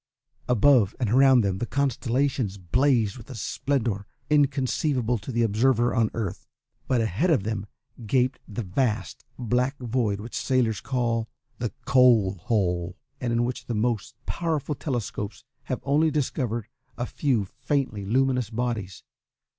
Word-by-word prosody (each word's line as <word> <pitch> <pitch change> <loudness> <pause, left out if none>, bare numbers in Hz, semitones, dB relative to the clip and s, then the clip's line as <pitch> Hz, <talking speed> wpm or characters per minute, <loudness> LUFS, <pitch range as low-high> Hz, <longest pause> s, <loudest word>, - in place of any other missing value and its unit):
Above 120 -3 +4
and 120 -5 0
around 130 0 +6
them 95 -3 -1
the 120 - -1
constellations 135 -5 0
blazed 115 +3 +2
with 115 - -13
a 130 - -7
splendour 110 -3 -1 0.2
inconceivable 135 -4 +2
to 105 - -10
an 120 -2 +1
observer 120 +2 +2
on 115 -2 +2
Earth, 105 -6 -4 0.4
but 125 - +2
ahead 115 - +1
of 145 - +3
them 105 -1 -3 0.4
gaped 130 +3 +2
the 110 +3 -4
vast, 110 +3 -1
black 125 +3 0
void 115 -5 -1
which 115 +3 -8
sailors 120 -5 +1
call 115 -3 -1 0.3
"the 120 -2 -2
Coal 125 -7 +5
Hole," 90 -2 -1 0.2
and 125 -2 -2
in 115 0 +2
which 125 0 -5
the 120 - -2
most 110 -1 -1
powerful 160 -3 -1
telescopes 115 -7 -4 0.2
have - - -3
only 150 +3 +3
discovered 125 -7 -1 0.3
a 120 - -1
few 125 -7 0
faintly 130 -1 -2
luminous 125 +2 +1
bodies. 115 -5 -3
120 Hz, 140 wpm, -26 LUFS, 105-130 Hz, 0.4 s, around